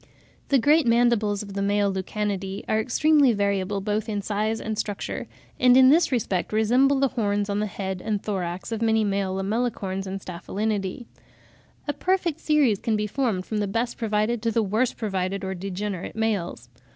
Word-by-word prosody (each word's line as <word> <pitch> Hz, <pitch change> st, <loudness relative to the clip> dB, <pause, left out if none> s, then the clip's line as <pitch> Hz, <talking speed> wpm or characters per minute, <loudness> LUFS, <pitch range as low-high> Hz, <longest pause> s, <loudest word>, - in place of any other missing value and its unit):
] -, -, -33 dB
The 275 Hz, -, +5 dB
great 295 Hz, +3 st, +4 dB
mandibles 230 Hz, -3 st, +2 dB
of 200 Hz, -1 st, -9 dB
the 200 Hz, -, -2 dB
male 200 Hz, 0 st, +1 dB
Lucanidae 195 Hz, 0 st, -3 dB
are 215 Hz, -, +1 dB
extremely 280 Hz, +2 st, +3 dB
variable 200 Hz, -1 st, 0 dB
both 210 Hz, +2 st, -2 dB
in 205 Hz, -2 st, -2 dB
size 215 Hz, +2 st, -1 dB
and 220 Hz, 0 st, -3 dB
structure, 205 Hz, -1 st, -4 dB, 0.3 s
and 250 Hz, 0 st, +6 dB
in 260 Hz, 0 st, +8 dB
this 320 Hz, +3 st, +4 dB
respect 200 Hz, -7 st, -1 dB
resemble 250 Hz, +6 st, +3 dB
the 275 Hz, -1 st, +3 dB
horns 205 Hz, -3 st, -1 dB
on 200 Hz, -, 0 dB
the 210 Hz, -, 0 dB
head 190 Hz, -2 st, -4 dB
and 215 Hz, -2 st, -1 dB
thorax 185 Hz, -2 st, -4 dB
of 225 Hz, 0 st, -3 dB
many 220 Hz, -1 st, +3 dB
male 195 Hz, -2 st, -1 dB
Lamellicorns 195 Hz, -2 st, -2 dB
and 195 Hz, +1 st, -4 dB
Staphylinidae. 195 Hz, +4 st, -3 dB, 0.8 s
A 290 Hz, -, 0 dB
perfect 360 Hz, -3 st, 0 dB
series 285 Hz, -11 st, +2 dB
can 225 Hz, -, 0 dB
be 210 Hz, 0 st, 0 dB
formed 210 Hz, -5 st, -1 dB
from 215 Hz, -, -2 dB
the 205 Hz, -, 0 dB
best 230 Hz, +5 st, -1 dB
provided 220 Hz, 0 st, 0 dB
to 230 Hz, -, 0 dB
the 225 Hz, 0 st, +1 dB
worst 220 Hz, +5 st, 0 dB
provided 195 Hz, -2 st, -2 dB
or 190 Hz, 0 st, -2 dB
degenerate 190 Hz, 0 st, -5 dB
males. 215 Hz, -6 st, -2 dB
210 Hz, 180 wpm, -25 LUFS, 195-235 Hz, 0.8 s, in